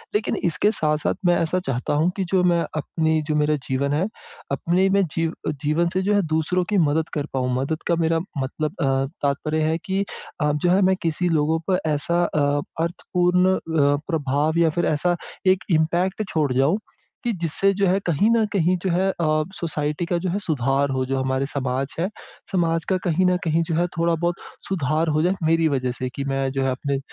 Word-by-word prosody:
लेकिन 210 - 0
इसके 180 +5 +2
साथ-साथ 150 -6 0
मैं 175 0 +5
ऐसा 170 +2 +1
चाहता 125 0 -1
हूँ 155 +4 +2
कि 195 - 0
जो 185 -2 +3
मैं 175 -1 +3 0.2
अपनी 160 +1 0
जो 155 - 0
मेरा 150 0 +2
जीवन 140 +2 0
है, 165 +7 +1 0.4
अपने 185 +3 +2
में 200 +1 +3
जीव 165 0 0
अ, - - +1
जीवन 155 +4 +2
से 185 - +1
जो 200 +2 +1
है 205 - +4
दूसरों 160 +4 +1
की 210 - +2
मदद 155 +2 0
कर 145 -2 -1
पाऊँ। 125 -1 0
मदद 150 +5 -2
का 170 - +3
मेरा 165 0 +2 0.2
मतलब 140 +3 -3
अ, - - +2 0.4
तात्पर्य 155 +2 0
है 160 +1 +1
कि 195 +1 0 0.4
आप 150 0 +2
जो 175 - +4
है, 190 +2 +4
मैं 190 0 +4
किसी 170 +2 0
लोगों 160 0 +2
पे 185 - +3 0.2
ऐसा 170 +4 +1
अ, 145 -3 +1 0.2
अर्थपूर्ण 180 +2 +1
अ, - - -2 0.5
प्रभाव 150 0 0
या 165 -1 +4
फिर 175 +3 -1
ऐसा 175 +4 +1 0.3
एक 185 0 +4
इम्पैक्ट 175 +5 +1
छोड़ 150 -4 0
जाऊँ 140 +10 +2 0.4
कि 240 - 0
जिससे 175 +4 +3
जो 195 0 +1
है, 185 +2 +2
कहीं 170 +6 +3
न 230 -1 +3
कहीं 180 -2 +2
जो 190 - 0
है 185 +3 +2
अ, 155 -4 +1 0.2
सोसाइटी 150 0 -2
का 175 +1 0
जो 180 +2 -2
है, 190 +4 -1
सुधार 140 -5 0
हो। 130 -1 0
जो 135 +1 -1
हमारे 130 +1 0
समाज 135 -1 -2
है, 175 - +1 0.4
समाज 165 -3 +1
का 190 - +2
कहीं 180 +1 +2
न 180 0 +3
कहीं 165 0 +1
जो 165 - 0
है, 170 +2 +2
थोड़ा-बहुत 170 +1 +1 0.3
सुधार 160 -3 0
हो 155 - +3
जाए, 180 +2 +2
मेरी 165 0 +3
वजह 130 -3 0
से 130 -1 -2
कि 140 - -3
मैं 135 -1 -1
जो 135 0 -1
है 135 - +1
अपने 140 +2 -2
160 Hz, 210 wpm, -23 LUFS, 145-180 Hz, 0.5 s, मैं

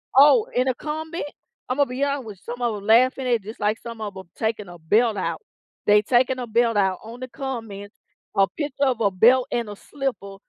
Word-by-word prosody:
Oh, 295 - +7
in 250 +1 +1
a 255 - +1
comment, 315 +4 -5 0.5
Imma 280 +1 +2
be 255 +3 -3
honest 280 -2 -1
with 205 -4 -9
some 245 +4 -8
of 235 -3 0
'em 200 - -8
laughing 255 +4 +4
at 250 - +2
it 225 - -3
just 220 +3 -9
like 210 +2 0
some 230 -1 -8
of 205 -2 -5
'em 190 -2 -10
taking 220 -3 -2
a 175 - -10
belt 210 +7 +2
out. - - -2 0.5
They 210 0 +6
taking 255 +3 +2
a 245 - -3
belt 230 0 +2
out 190 -2 +1
on 230 +2 -10
the 255 - -6
comment, 225 -7 -6 0.4
a 195 0 +4
picture 285 - -4
of 250 -3 0
a 200 - +4
belt 245 +7 +4
and 235 -3 -1
a 205 - -7
slipper 240 -6 -5
235 Hz, 225 wpm, -23 LUFS, 205-260 Hz, 0.5 s, Oh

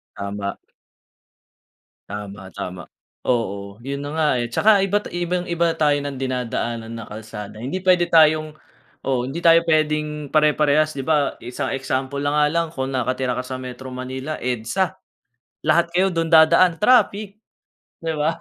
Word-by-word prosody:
Tama. 100 0 -4 1.5
Tama, 100 -1 -7
tama. 90 -1 -6 0.4
Oo, 100 -2 -2
yun 140 +1 -4
na 145 0 -5
nga, 155 -1 +2
eh. 120 - -1
Tsaka 205 - +4
iba't 200 +2 0
ibang-iba 175 -1 -1
tayo 145 -2 +2
ng 140 -1 -5
dinadaanan 120 -3 -3
na 115 - -6
kalsada 105 -1 -9
hindi 160 +10 -4
pwede 180 -2 +4
tayong 155 -2 +4 0.5
oo, 130 -2 0
hindi 165 +6 -5
tayo 165 0 +7
pwedeng 150 -2 0
pare-parehas. 150 0 +3
Di 135 - -4
ba, 150 -1 +1
isang 125 +2 -3
example 135 +1 -2
na 145 - +1
nga 150 0 +3
lang 165 +2 0
kung 130 -4 -3
nakatira 125 0 -1
ka 125 - -3
sa 130 0 -6
Metro 130 0 -8
Manila, 130 +4 -5
EDSA- 125 - -1 0.7
lahat 170 0 +3
kayo 190 +2 +3
dun 165 -1 -1
dadaan- 165 +3 +6
traffic, 210 -3 +3 0.7
di 165 - -2
ba? 160 +2 +1
145 Hz, 145 wpm, -22 LUFS, 125-165 Hz, 1.5 s, tayo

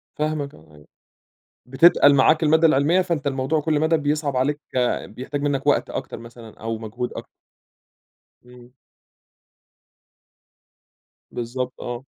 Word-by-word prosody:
فاهمَك 150 -2 -3
آه 75 0 -20
أيوه. 75 0 -19 0.8
بتتقَل 145 +2 +5
معاك 155 +4 +4
المادة 160 +1 +4
العلمية 155 +4 +3
فأنت 170 -5 -3
الموضوع 135 +3 0
كل 155 -1 0
مدى 160 +1 +2
بيصعَب 145 -2 -1
عليك، 145 +3 0 0.5
بيحتاج 130 +5 -6
منك 145 -2 -1
وقت - - +2
أكتر - - -6
مثلًا 115 -1 -13
أو 115 0 -4
مجهود 115 +3 -5
أكتر. - - -8 1.2
امم. 125 0 -17 2.6
بالضبط 125 +2 -4
آه. 120 +1 -6
140 Hz, 120 wpm, -22 LUFS, 120-150 Hz, 2.6 s, بتتقَل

